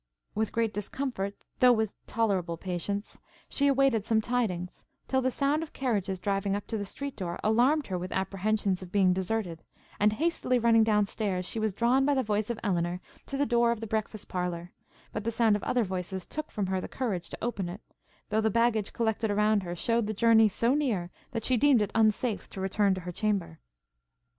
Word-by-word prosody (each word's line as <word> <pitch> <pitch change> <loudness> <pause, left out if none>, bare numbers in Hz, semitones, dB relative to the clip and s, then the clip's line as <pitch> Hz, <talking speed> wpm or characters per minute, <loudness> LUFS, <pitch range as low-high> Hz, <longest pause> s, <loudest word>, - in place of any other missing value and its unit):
With 220 +1 -1
great 225 -2 0
discomfort, 205 -1 -3 0.2
though 250 -1 +7
with 220 -3 0
tolerable 190 -7 0
patience, 190 +4 -4 0.3
she 280 - +1
awaited 270 -5 +3
some 220 0 +2
tidings, 215 -7 -2 0.2
till 265 -1 +1
the 260 - +2
sound 280 +4 +1
of 325 - -7
carriages 205 -8 -1
driving 195 +1 0
up 205 - -4
to 225 - -1
the 200 - -4
street 280 +6 -6
door, 175 -2 -4
alarmed 255 +7 +3
her 185 -2 -3
with 180 +1 -5
apprehensions 195 0 0
of 180 -1 -9
being 190 -3 +4
deserted, 190 -3 -2 0.4
and, 210 +1 +4
hastily 295 -2 +1
running 230 -1 +5
down 210 -2 +3
stairs, 195 -3 -2
she 225 - -1
was 215 -1 +1
drawn 240 +7 +2
by 285 +1 +2
the 260 - +2
voice 210 0 -1
of 235 - -3
Elinor 175 -3 0 0.3
to 275 - -3
the 285 - +2
door 235 -2 +3
of 235 - -2
the 225 - -5
breakfast 215 -1 -3
parlour; 180 -1 -3 0.4
but 215 - -3
the 230 - 0
sound 225 -2 +3
of 205 - -2
other 245 -2 +1
voices 185 -1 -4
took 310 0 -5
from 205 - -2
her 190 0 -1
the - - -5
courage 200 -10 -3
to - - -7
open 200 -7 -2
it, 190 +5 -8 0.5
though 215 0 +2
the 220 - +2
baggage 225 -1 +1
collected 220 -1 0
around 210 0 +3
her 175 -2 -5
shewed 230 +4 +1
the 215 - -3
journey 225 0 +5
so 235 +5 +1
near, 225 -12 0 0.2
that 230 -2 -3
she 255 - +3
deemed 275 0 +5
it 210 -2 0
unsafe 220 0 +1
to - - -8
return 195 +1 +2
to 185 - -5
her 180 +1 -5
chamber. 195 - -1
215 Hz, 205 wpm, -29 LUFS, 190-235 Hz, 0.5 s, though